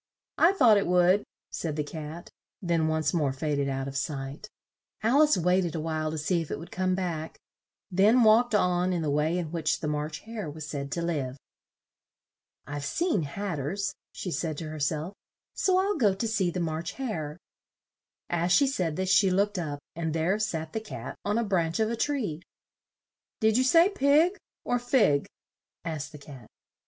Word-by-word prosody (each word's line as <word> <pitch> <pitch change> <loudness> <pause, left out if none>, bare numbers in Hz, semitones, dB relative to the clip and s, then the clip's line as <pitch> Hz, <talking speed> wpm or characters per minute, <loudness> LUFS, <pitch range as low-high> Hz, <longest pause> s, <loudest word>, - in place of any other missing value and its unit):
"I 345 +4 +6
thought 245 - +6
it 200 - +1
would," 180 +3 +4 0.3
said 160 -3 -3
the 150 - -1
Cat, 155 +2 -8 0.3
then 170 -3 +1
once 155 -2 0
more 150 -6 +1
fa 145 +3 -2
ded 140 -1 0
out 135 0 -2
of 140 - -7
sight. 140 +7 -4 0.5
Al 250 +7 +4
ice 305 0 +5
wait 180 +2 +3
ed 170 -2 -3
a - - -1
while 155 0 -2
to 160 - -4
see 170 +3 0
if 160 - -7
it - - -3
would 165 - -10
come 185 0 0
back, 170 -4 -3 0.5
then 210 +7 +5
walked 225 +1 +5
on 180 -2 +2
in 170 -2 -1
the 150 - 0
way 155 +4 +1
in 165 -4 -3
which 160 -2 0
the 150 - -3
March 150 +1 -3
Hare 220 -6 -6
was 155 0 -7
said 140 -2 -5
to 170 - -2
live. 140 -6 -2 1.3
"I've 145 0 -5
seen 325 - 0
Hat 175 +4 -4
ters," 180 +9 -2 0.2
she 180 - -5
said 160 -3 -2
to 155 0 -5
her 155 0 -6
self; 155 +5 -1 0.4
"so 370 -1 +2
I'll 395 +2 +1
go 205 -6 +3
to 225 +4 -2
see 200 -5 +1
the 180 - -3
March 165 0 -3
Hare." 165 - -4 0.9
As 175 +1 0
she 280 - +6
said 180 - -1
this, 185 +1 -1
she 195 +1 +5
looked 200 +1 +1
up, 150 -4 -3 0.2
and 160 -1 -2
there 175 +6 +1
sat 160 -7 -2
the 220 - -1
Cat 220 -1 -7
on 205 +2 0
a 235 - +2
branch 170 -5 0
of 220 0 +1
a - - -1
tree. 225 - -1 1.0
"Did 220 0 +3
you 255 - +4
say 330 +7 +6
pig, 325 +2 +3 0.3
or 245 - 0
fig?" 230 - +2 0.6
asked 155 -3 -4
the 150 - -10
Cat. 140 -5 -12
175 Hz, 195 wpm, -28 LUFS, 155-210 Hz, 1.3 s, I